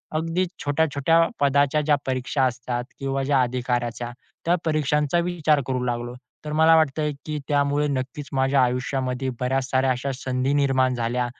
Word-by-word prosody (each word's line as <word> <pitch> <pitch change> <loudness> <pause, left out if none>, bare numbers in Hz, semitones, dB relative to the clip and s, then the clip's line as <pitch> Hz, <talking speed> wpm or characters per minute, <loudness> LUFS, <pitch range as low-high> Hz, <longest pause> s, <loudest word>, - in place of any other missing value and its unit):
अगदी 165 +3 0 0.2
छोट्या-छोट्या 145 +1 +2 0.2
पदाच्या 140 +1 +3
ज्या 150 0 +3
परीक्षा 130 +1 -1
असतात 125 0 -2 0.2
किंवा 135 0 -1
ज्या 135 -1 +3
अधिकाराच्या, 120 -1 -2 0.3
त्या 175 +1 +3
परीक्षांचा 150 0 +1
विचार 160 -4 +1
करू 130 -1 -1
लागलो. 120 0 -3 0.3
तर 150 - -4
मला 160 +1 +6
वाटतंय, 150 -1 +2
की 155 -1 -3
त्यामुळे 145 0 +1
नक्कीच 140 +1 -4
माझ्या 135 0 +3
आयुष्यामध्ये 125 +1 -1
बऱ्याच 130 +1 -1
साऱ्या 130 0 +2
अशा 130 +2 -2
संधी 130 +1 -1
निर्माण 130 -3 +2
झाल्या 120 +1 -1
135 Hz, 145 wpm, -24 LUFS, 130-150 Hz, 0.3 s, मला